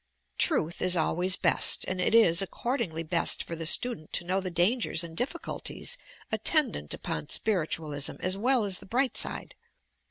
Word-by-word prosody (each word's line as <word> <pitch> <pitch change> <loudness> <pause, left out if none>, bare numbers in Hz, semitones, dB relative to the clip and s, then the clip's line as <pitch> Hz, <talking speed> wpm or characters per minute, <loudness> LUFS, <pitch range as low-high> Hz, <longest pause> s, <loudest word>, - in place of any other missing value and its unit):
"Tnith 165 +2 +2
is 185 -1 +3
always 180 +3 +1
best," - - +3
and 185 0 -2
it 215 - +2
is 175 -7 +5
accordingly 195 - -3
best 170 +1 0
for 170 - -6
the 165 -1 -3
student 160 -6 +1
to - - -1
tnow 185 +2 0
the 185 - -4
dangers 180 +1 +1
and 165 -1 -8
difficulties 330 - -3 0.4
attendant 220 - +1
upon 75 -1 -5
Spiritualism 155 -7 0
as 185 +1 0
well 245 +3 +2
as 195 -3 0
the - - -13
bright 255 +5 0
side. - - -2
185 Hz, 160 wpm, -28 LUFS, 165-230 Hz, 0.4 s, is